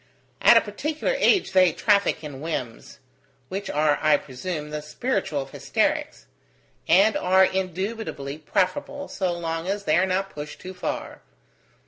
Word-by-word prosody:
At 235 - +8
a - - +6
particular 300 - -2
age 405 - +3
they 185 -2 +5
traffic 200 -5 +2
in 140 -3 -8
whims: 135 -8 -5 0.5
which 195 +2 -4
are, 150 0 +2
I 155 - +5
presume, 150 +3 -6
the 150 0 -4
spiritual 150 - -2
of 135 - -15
hysterics; - - -1 0.6
and 195 +6 +5
are 190 +1 +4
indubitably 185 -6 -3
preferable, 210 - -1
so 185 -2 -2
long 165 0 -3
as 200 +1 -2
they 155 -3 +2
are 190 - +2
not 195 +1 -1
pushed 150 0 -8
too 185 - -8
far. 180 - -5
185 Hz, 145 wpm, -24 LUFS, 150-200 Hz, 0.6 s, At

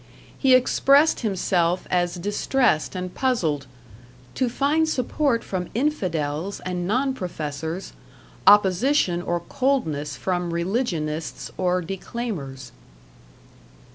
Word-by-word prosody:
He 265 -2 +5
expressed 275 +4 +4
himself 180 -4 0
as 175 -1 +1
distressed 205 - +1
and 180 0 -4
puzzled 160 - 0 0.7
"to 255 -2 0
find 300 +6 +1
support 260 -2 0
from 180 -2 -4
infidels 185 - -1
and 180 -1 -3
non 260 +6 +1
professors; 160 - -5 0.5
opposition 200 -1 +4
or 175 -1 -2
coldness 160 - -1
from 175 +2 -2
religionists 170 -5 -2
or 180 -1 0
declaimers." 165 - -5
185 Hz, 95 wpm, -24 LUFS, 170-250 Hz, 0.7 s, He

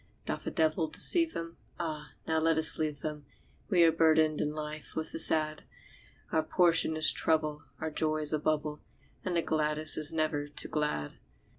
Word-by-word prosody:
Doth - - -5
a - - +1
devil 160 +1 0
deceive 330 - +3
them? 165 0 -7 0.2
Ah, 155 -4 -5
now 160 0 +1
let 160 0 +1
us 160 - +3
leave 150 -3 -3
them 150 -2 -6 0.4
We 180 -5 +4
are 165 - +5
burdened 160 -1 +2
in 150 - -1
life 155 0 -7
with 160 0 -4
the - - -3
sad; 155 -1 +2 0.7
Our 160 - +2
portion 165 -1 +2
is 155 0 +4
trouble, 155 -2 -1
our 160 0 -4
joy 155 0 -1
is 150 0 -1
a 155 - 0
bubble, 150 0 -2 0.4
And 180 -2 -2
the 165 - 0
gladdest 155 0 +3
is 150 -1 +6
never 155 -2 -2
too 145 - -4
glad. 150 - -3
155 Hz, 180 wpm, -30 LUFS, 150-160 Hz, 0.7 s, is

